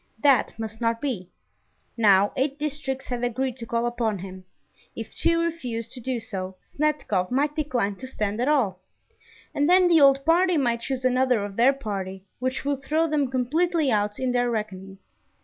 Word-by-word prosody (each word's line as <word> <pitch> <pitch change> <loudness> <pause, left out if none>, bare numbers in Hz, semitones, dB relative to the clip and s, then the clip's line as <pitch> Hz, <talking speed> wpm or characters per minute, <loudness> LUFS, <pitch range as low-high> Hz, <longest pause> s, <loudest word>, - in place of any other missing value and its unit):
That 275 -6 +3
must 225 0 -6
not 230 0 +1
be. 225 -11 -3 0.7
Now 205 -3 +4
eight 275 +1 0
districts 285 -3 -4
had 245 -1 -3
agreed 250 +1 -1
to 230 -2 -8
call 235 +1 0
upon 235 -3 -1
him: 185 0 -9 0.5
if - - -7
two 335 0 +2
refused 250 -10 -3
to 260 - -8
do 250 0 -2
so, 190 -4 -6
Snetkov 280 -11 -1
might 290 +4 0
decline 250 -10 -1
to 260 - -8
stand 210 -3 -2
at 250 - +1
all; 235 -12 +2 0.7
and 290 +2 +1
then 365 0 +6
the 335 -3 +5
old 275 0 +5
party 350 +2 +4
might 235 -4 +1
choose 260 0 -3
another 255 -4 +2
of 200 -1 -8
their 240 +5 +5
party, 195 -7 -5 0.2
which 255 +2 -2
would 280 -1 -1
throw 315 +4 +1
them 295 -4 0
completely 300 +4 +1
out 210 -1 0
in 255 -1 -1
their 245 0 +1
reckoning. 195 -4 -4
250 Hz, 180 wpm, -25 LUFS, 215-285 Hz, 0.7 s, then